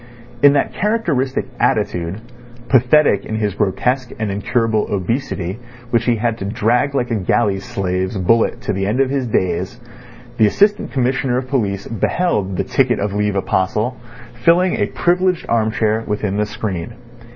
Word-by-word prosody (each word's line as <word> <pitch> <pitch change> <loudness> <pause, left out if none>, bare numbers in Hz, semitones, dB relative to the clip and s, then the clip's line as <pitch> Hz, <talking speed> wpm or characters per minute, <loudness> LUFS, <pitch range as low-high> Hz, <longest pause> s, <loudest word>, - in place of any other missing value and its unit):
In 145 0 +7
that 140 - 0
characteristic 170 - 0
attitude, 90 +4 0 0.5
pathetic 135 +4 +4
in 110 - -5
his 105 -2 -1
grotesque 120 +6 0
and 110 -2 -2
incurable 110 +2 0
obesity 100 -1 -2 0.3
which 120 0 +2
he 120 - +3
had 115 0 -1
to 95 - -4
drag 120 +7 +1
like 125 -3 -1
a - - +2
galley 100 +1 +1
slave's 95 0 -2
bullet 115 +5 +2
to - - -2
the 95 0 -1
end 110 +6 0
of 135 -1 +2
his 135 -3 -1
days, 95 +3 -1 0.6
the 110 - +5
Assistant 205 - +2
Commissioner 130 -1 0
of 130 0 -4
Police 100 -7 -1
beheld 105 - -1
the - - +1
ticket 125 -4 +1
of 100 0 -2
leave 105 0 0
apostle 100 +5 0 0.5
filling 180 +2 +4
a - - 0
privileged 180 0 +1
arm 110 -2 +1
chair 110 -1 0
within 105 -1 -2
the 105 0 0
screen. 95 -5 -5
115 Hz, 160 wpm, -18 LUFS, 100-130 Hz, 0.6 s, In